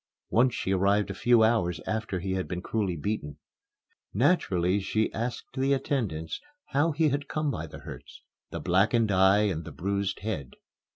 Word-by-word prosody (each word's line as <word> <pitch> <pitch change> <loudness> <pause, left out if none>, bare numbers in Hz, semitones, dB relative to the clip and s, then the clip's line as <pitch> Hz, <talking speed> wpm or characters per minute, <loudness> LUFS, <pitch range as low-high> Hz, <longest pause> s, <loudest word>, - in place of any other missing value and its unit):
Once 125 +2 +3
she 95 - -2
arrived 100 +2 +2
a - - -3
few 120 +3 +4
hours 90 -7 +2
after 110 -4 -2
he 95 +2 -3
had 95 -1 -1
been 90 -1 -3
cruelly 100 -1 -1
beaten. 75 -3 -3 0.8
Naturally 100 - +2
she 110 +3 0
asked 120 +2 -4
the 135 +1 +2
attendants 115 - -2 0.3
how 145 +4 +2
he 155 +1 +2
had 145 +1 -2
come 155 -2 0
by 80 - -4
the - - -10
hurts - - -10 0.3
the - - -5
blackened 105 +5 +2
eye 95 +2 +5
and 90 -6 -1
bruised 100 +1 -1
head. 90 -12 -4
100 Hz, 165 wpm, -28 LUFS, 95-120 Hz, 0.8 s, eye